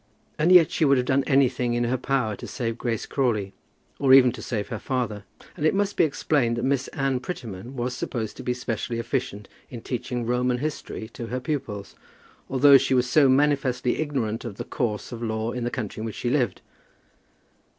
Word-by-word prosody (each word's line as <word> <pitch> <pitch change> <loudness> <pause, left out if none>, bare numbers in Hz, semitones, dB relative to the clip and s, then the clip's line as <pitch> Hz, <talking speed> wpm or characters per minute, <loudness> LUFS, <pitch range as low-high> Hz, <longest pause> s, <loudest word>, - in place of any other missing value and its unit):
And 165 +4 +3
yet 175 -2 +7
she - - 0
would 140 -2 +5
have 125 - +1
done 135 +1 +2
anything 125 -3 +2
in 120 - +1
her 120 +2 +1
power 130 -4 0
to - - -8
save 115 -3 -3
Grace 115 -3 -2
Crawley, 110 -8 -1 0.5
or 135 -2 +5
even 125 -2 +7
to - - -9
save 105 -3 -3
her 115 -4 -4
father. 110 -6 -3 0.3
And - - -6
it 155 - +3
must 205 0 0
be - - +4
explained 140 -5 +1
that 120 - -1
Miss 135 0 0
Anne 135 -2 -1
Prettyman 120 - -7
was 125 0 -2
supposed 115 -4 -4
to - - -7
be 125 - -1
specially 115 -1 -3
efficient 115 -3 -3 0.2
in 120 -3 -8
teaching 120 0 -3
Roman 125 +1 +1
history 145 -5 -5
to 115 0 -7
her 125 +2 -3
pupils, 125 -8 -4 0.6
although 135 +1 +7
she 135 0 +1
was 125 0 +2
so 140 +1 +5
manifestly 135 -3 +2
ignorant 130 -8 -2
of 110 -5 -7
the - - -4
course 110 -3 -3
of 120 -1 -7
law 110 0 -2
in 125 -1 -3
the - - 0
country 110 -3 -5
in - - -3
which 110 - -5
she 120 - -2
lived. 125 -9 0
125 Hz, 200 wpm, -25 LUFS, 115-135 Hz, 0.6 s, yet